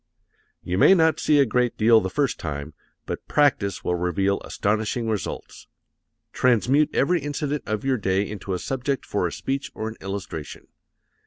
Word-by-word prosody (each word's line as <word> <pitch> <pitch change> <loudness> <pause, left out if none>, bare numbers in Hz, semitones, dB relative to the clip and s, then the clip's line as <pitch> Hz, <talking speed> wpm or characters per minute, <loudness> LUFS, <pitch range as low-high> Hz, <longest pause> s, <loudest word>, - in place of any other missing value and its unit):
You 90 +2 -1
may 190 - +7
not 160 -2 +3
see 150 - +3
a 140 - +5
great 125 +1 0
deal 110 0 +5
the 95 - -2
first 140 +4 -1
time, 75 -1 -5 0.3
but - - -6
practise 120 -10 +1
will 90 - 0
reveal 95 +3 0
astonishing 110 +3 -1
results. 110 -3 -4 0.7
Transmute 130 +4 +3
every 175 +5 +3
incident 145 0 -2
of 110 +2 -2
your 135 -1 +2
day 95 -1 0
into 100 -2 -4
a - - -1
subject 135 +6 -3
for 100 -3 -1
a - - -5
speech 135 +1 -3
or 110 - -3
an 110 - -10
illustration. 95 -6 -6
110 Hz, 165 wpm, -24 LUFS, 95-135 Hz, 0.7 s, may